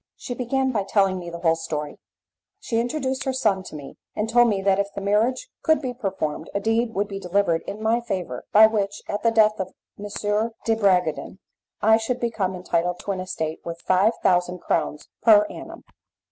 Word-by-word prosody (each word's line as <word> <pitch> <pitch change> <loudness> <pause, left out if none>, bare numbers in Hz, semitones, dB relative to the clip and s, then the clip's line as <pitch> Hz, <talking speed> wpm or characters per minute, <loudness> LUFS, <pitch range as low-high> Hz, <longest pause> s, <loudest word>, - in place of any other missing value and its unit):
She 250 - -6
began 260 +2 0
by 215 -5 0
telling 195 -1 +2
me 175 -1 -7
the 170 - -6
whole 165 -1 +2
story. 150 -2 -5 0.6
She 230 - -1
introduced 265 +2 -2
her 265 - 0
son 215 -7 +1
to - - -9
me, 140 -2 -9 0.2
and 210 - -1
told 240 +1 +5
me 200 -3 0
that 195 0 +3
if 200 0 -1
the - - -3
marriage 215 - +1
could 315 -1 +3
be 255 -4 -4
performed, 190 - -3
a - - +2
deed 225 +2 0
would 200 +1 0
be 195 -1 -6
delivered 180 -3 +1
in 210 +2 -6
my 230 +2 +2
favour 185 - -4
by 215 +1 +8
which, 205 -2 -1
at 205 - -3
the 230 - +3
death 215 -1 +3
of 185 -1 -4 0.3
M. 205 - -5 0.6
de 225 - +3
Bragadin, 185 -6 +1 0.5
I 220 +1 +6
should 240 +3 -2
become 220 -6 -1
entitled 180 -1 -1
to 200 - -3
an 190 - -3
estate 160 -4 -4
worth 170 0 -6
five 190 +5 +3
thousand 180 -1 +2
crowns 150 - -1
per 210 -3 +7
annum. - - -10
200 Hz, 200 wpm, -24 LUFS, 180-225 Hz, 0.6 s, by